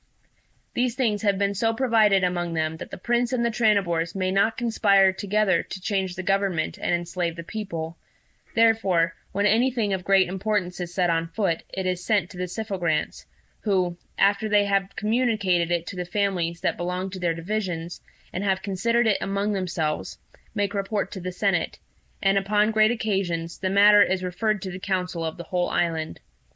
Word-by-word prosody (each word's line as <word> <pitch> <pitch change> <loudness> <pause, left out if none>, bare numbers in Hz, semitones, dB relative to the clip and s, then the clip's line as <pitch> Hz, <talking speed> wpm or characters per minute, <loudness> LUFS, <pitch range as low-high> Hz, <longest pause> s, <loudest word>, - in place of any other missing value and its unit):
"These 245 -1 0
things 225 -6 0
have 200 -3 +2
been 200 0 +1
so 225 +3 0
provided 220 -6 +3
among 175 -2 -1
them 160 0 -1
that - - -8
the - - -7
Prince 240 +4 0
and 235 -2 +1
the 235 - +1
Tranibors 195 -7 +1
may 185 -1 0
not 200 +4 +2
conspire 200 -5 +4
together 200 -2 +1
to 195 - -8
change 190 -2 -2
the 185 - -5
government 195 -4 0
and - - 0
enslave 175 -1 -1
the 170 - -7
people; 170 -5 -5 0.5
and - - -29
therefore 200 -7 +3 0.2
when 200 +1 0
anything 225 -1 +2
of 185 -1 -2
great 195 -1 +4
importance 190 -1 -2
is 175 -1 -4
set 175 -1 +1
on 165 0 0
foot, 170 -1 -1
it 190 -1 -4
is 180 -1 -1
sent 200 -5 +1
to 185 - -11
the 180 0 -2
Syphogrants, 180 -5 -2 0.3
who, 185 -4 0 0.2
after 200 +2 +2
they 205 -1 +4
have 195 -1 0
communicated 210 -7 +1
it 170 -1 0
to 185 - -7
the 180 - -3
families 175 -3 -1
that 190 - 0
belong 180 +2 -3
to 190 - -6
their 170 -2 0
divisions, 175 -2 -4 0.3
and 185 - -3
have 190 -2 0
considered 230 +5 +1
it 215 -3 +3
among 200 +2 -1
themselves, 170 -5 -2 0.4
make 205 -1 0
report 200 +1 -2
to 190 - -6
the 185 0 -4
senate; 180 -2 0 0.5
and, 195 0 +4
upon 210 +2 +2
great 215 0 +4
occasions, 190 -7 -2
the 190 - -1
matter 205 +2 +7
is 190 -2 +2
referred 210 +3 -1
to 190 - -4
the 185 - -7
council 180 -3 -2
of 160 -1 -4
the 175 - -6
whole 175 +1 -1
island. 160 -2 -1
195 Hz, 190 wpm, -25 LUFS, 175-210 Hz, 0.5 s, matter